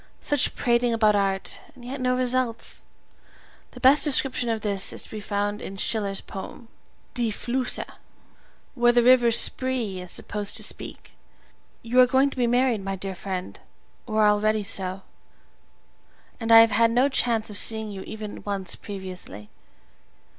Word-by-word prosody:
Such 290 -2 +1
prating 235 -1 +1
about 215 -2 +3
art, 195 -1 -1 0.2
and 245 -2 -14
yet 260 +2 -6
no 250 0 +1
results!!! 255 -2 -2 0.8
The - - -13
best 270 +3 +5
description 260 -4 +1
of 225 -1 -2
this 200 -2 +1
is - - -4
to - - -15
be 215 - -6
found 205 0 -3
in 195 - -7
Schiller's 200 -1 -2
poem 225 +4 -10 0.4
"Die 240 - -1
Flüsse," 250 +4 -2 0.9
where 240 -1 +3
the 240 0 +3
river 245 -1 +5
Spree 235 -4 +1
is 180 -1 -8
supposed 205 +3 -2
to - - +3
speak. - - -6 0.7
You 235 +2 +1
are 250 - +7
going 265 +2 +2
to - - -11
be 245 -1 +1
married, 245 -3 +1
my 195 0 -3
dear 195 0 -5
friend, 185 0 -6 0.5
or 215 -1 +1
are 210 - +6
already 215 +1 +1
so, 190 -2 0 1.4
and 225 -1 -2
I 225 0 +10
have 225 0 +4
had 230 +2 +3
no 245 +4 +3
chance 230 -5 0
of 205 - +1
seeing 220 -1 0
you 195 -1 -7
even 215 +1 -8
once 195 -3 -3
previously. 185 - -9
225 Hz, 160 wpm, -24 LUFS, 200-245 Hz, 1.4 s, I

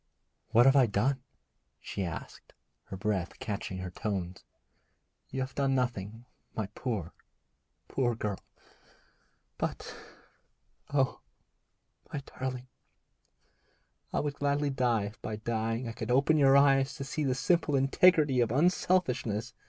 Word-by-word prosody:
What 120 +2 +6
have 135 +1 +6
I 130 -3 +6
done?' 125 +6 +1 0.6
she 100 - -4
asked, 85 -2 -7 0.3
her 95 - -7
breath 95 -2 -2
catching 100 -6 -4
her 90 -1 -5
tones. 95 -3 -4 0.9
'You 135 - -3
have 130 +1 -4
done 135 -1 +1
nothing, 115 -3 -2 0.3
my 105 -3 -2
poor, 105 -11 -3 0.7
poor 120 -3 0
girl; 105 -3 -3 1.2
but - - -4 1.0
oh, 135 -2 +1 0.9
my 145 - -2
darling, 130 -1 -5 1.4
I - - 0
would 145 -1 -2
gladly 145 0 0
die 125 -5 +1
if 100 +2 -7
by 110 - -4
dying 115 +2 -2
I - - -3
could 110 0 -6
open 140 +5 +4
your 140 -2 +6
eyes 135 -1 +4
to 140 - -5
see 150 +3 -3
the 130 -3 +1
simple 150 +2 +2
integrity 140 0 +4
of 115 - +2
unselfishness!' 130 - +1
125 Hz, 130 wpm, -30 LUFS, 110-140 Hz, 1.4 s, What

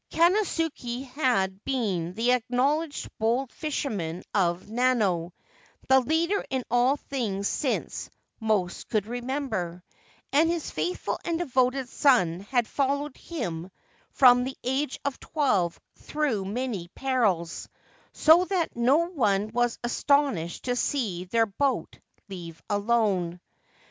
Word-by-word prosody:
Kansuke 325 - +1
had 210 -9 0
been 190 -10 -1
the 235 +3 +2
acknowledged 265 +6 0
bold 235 +4 +1
fisherman 205 - -3
of 175 -3 +1
Nanao, 215 -8 +1 0.6
the 265 0 +7
leader 330 +9 +1
in 260 -1 -1
all 245 +4 +3
things 210 -9 -2
since 275 -4 -2 0.3
most 210 -6 -1
could 215 -3 +1
remember, 240 -8 -3 0.5
and 315 +4 +5
his 335 -2 -2
faithful 360 - -2
and 335 -1 -1
devoted 260 -4 +1
son 210 - +3
had 235 +3 0
followed 280 +1 -1
him 185 - -5 0.4
from 245 -2 +6
the 265 +1 -5
age 265 +2 -1
of 280 -2 -2
twelve 205 - 0 0.2
through 280 -10 -1
many 210 -4 -3
perils; 215 -11 0 0.4
so 325 +4 +5
that 365 -3 -1
no 265 +8 +3
one 215 - +1
was 240 0 +1
astonished 240 - +1
to 245 -1 0
see 220 - -1
their 225 +5 +2
boat 260 +6 -1 0.3
leave 170 -4 -8
alone. 205 -5 +1
245 Hz, 120 wpm, -27 LUFS, 195-280 Hz, 0.6 s, the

